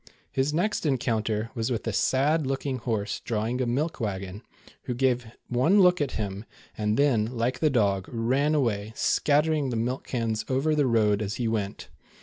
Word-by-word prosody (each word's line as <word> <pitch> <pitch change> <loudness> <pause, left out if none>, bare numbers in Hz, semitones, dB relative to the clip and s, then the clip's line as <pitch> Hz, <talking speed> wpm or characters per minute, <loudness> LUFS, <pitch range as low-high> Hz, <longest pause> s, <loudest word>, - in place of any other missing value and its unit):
His 135 +2 0
next 180 +8 0
encounter 115 -5 0
was 115 -2 -2
^with 120 -3 -2
a 115 - -2
sad 140 +7 +2
looking 135 -1 -2
horse 110 -4 -2
drawing 115 +3 -2
a 125 - 0
milk 145 +7 -1
wagon, 100 -2 -4 0.4
who 125 - -2
gave 125 -2 +1 0.2
one 130 +12 +3
look 180 -3 +5
at 140 -3 -1
him, 100 -1 -4 0.3
and 105 0 0
then 135 -7 +3
like 125 +1 -2
the 155 - +3
dog, 100 -7 +1
ran 130 +6 +1
away, 110 -6 0
scattering 150 -1 +2
the 120 - -2
milk 120 +4 -2
cans 115 -3 -1
over 135 +4 +1
the 145 -3 +2
road 110 -3 +2
as 105 0 -3
he 120 - -1
went. 105 -3 -3
120 Hz, 175 wpm, -26 LUFS, 110-140 Hz, 0.4 s, look